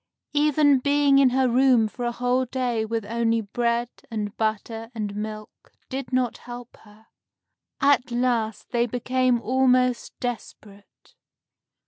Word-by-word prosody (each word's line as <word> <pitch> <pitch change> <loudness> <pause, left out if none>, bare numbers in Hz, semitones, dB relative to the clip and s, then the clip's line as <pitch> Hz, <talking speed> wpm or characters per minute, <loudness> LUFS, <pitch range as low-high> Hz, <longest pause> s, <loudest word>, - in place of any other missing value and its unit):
Even 295 -1 +4
being 285 0 +3
in 270 -2 +6
her 260 +1 +2
room 250 -2 +4
for 240 +3 -6
a 240 - 0
whole 250 +2 0
day 245 -3 -1
with 225 -1 -3
only 230 +1 0
bread 235 +2 -1 0.2
and 215 -2 -4
butter 225 +1 -3
and 205 -2 -4
milk 215 0 -8 0.2
did 265 -2 -5
not 255 -2 0
help 240 0 -10
her. 215 +1 -20 0.8
At 275 -3 +3
last 240 -3 -1
they 240 0 +1
became 250 +1 +1
almost 255 0 +1
desperate. 210 -4 -8
240 Hz, 130 wpm, -24 LUFS, 225-255 Hz, 0.8 s, in